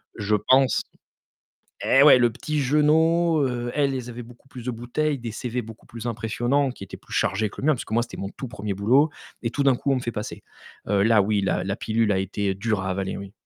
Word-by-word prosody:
Je 105 -1 0
pense 130 +3 +3 1.0
eh 135 - +5
ouais, 145 -3 +8
le 120 -2 +3
petit 150 +6 -3
jeunot, 160 +3 +3
heu, 120 -1 -3
elles, 140 -2 +1
elles 125 -1 -5
avaient 120 0 -7
beaucoup 120 +3 -17
plus 125 -3 -10
de 125 - -1
bouteilles, 130 +5 -2
des 115 -2 -5
CV 125 +2 -3
beaucoup 115 0 -12
plus 115 0 -7
impressionnants 120 +4 0
qui 110 - -10
étaient 100 - -9
plus - - -14
chargés 105 +1 +1
que - - -9
le 140 - -1
mien, 155 - +5
parce - - -7
que, - - -7
moi, 115 - +3
c'était - - -10
mon 100 - -4
tout 130 - -8
1er 105 -4 -4
boulot 130 +10 +3 0.3
et 115 - -1
tout 120 - -2
d'un 135 -2 +4
coup, 140 +3 -1
on - - +3
me - - -3
fait 120 - -3
passer. 105 -1 -6 0.5
Heu, 100 0 +2
là 110 -1 +5
oui, 100 0 +1
la 95 - 0
la 95 +1 -2
pilule 110 0 0
a 95 - +2
été 95 0 -2
dure 105 -1 -1
à 95 - -3
avaler, 95 0 -2
oui. 100 0 -8
120 Hz, 245 wpm, -24 LUFS, 105-135 Hz, 1.0 s, ouais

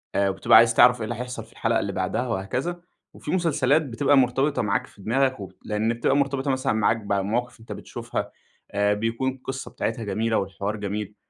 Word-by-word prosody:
آآ 100 0 +3
وبتبقى 95 +3 +5
عايز 115 0 +6
تعرَف 125 +1 +6
إيه - - -3
اللي 115 +2 -3
هيحصَل 125 +2 -5
في - - -22
الحلقة - - 0
اللي - - -2
بَعدها 125 - -2
وهكذا، 125 - -3 0.3
وفي - - -6
مسلسلات 155 -5 +2
بتبقى 140 +1 +2
مرتبِطة 135 +3 +2
معاك 105 -2 0
في 100 - -18
دماغك 130 +4 +1
و 95 -2 -7 0.2
لأن 110 +2 0
بتبقى 120 +3 +1
مرتبطة 140 -1 0
مثلًا 130 -2 0
معاك 110 +1 +2
بمواقِف 105 +4 -2
أنت 115 - -12
بتشوفها، - - -5 0.4
آآ، 100 0 +2
بيكون 115 +5 -1
القِصّة 135 0 -7
بتاعتها 115 - -3
جميلة 110 +2 0
والحوار 100 +2 -3
جميل، 105 0 -4
115 Hz, 185 wpm, -24 LUFS, 105-130 Hz, 0.4 s, عايز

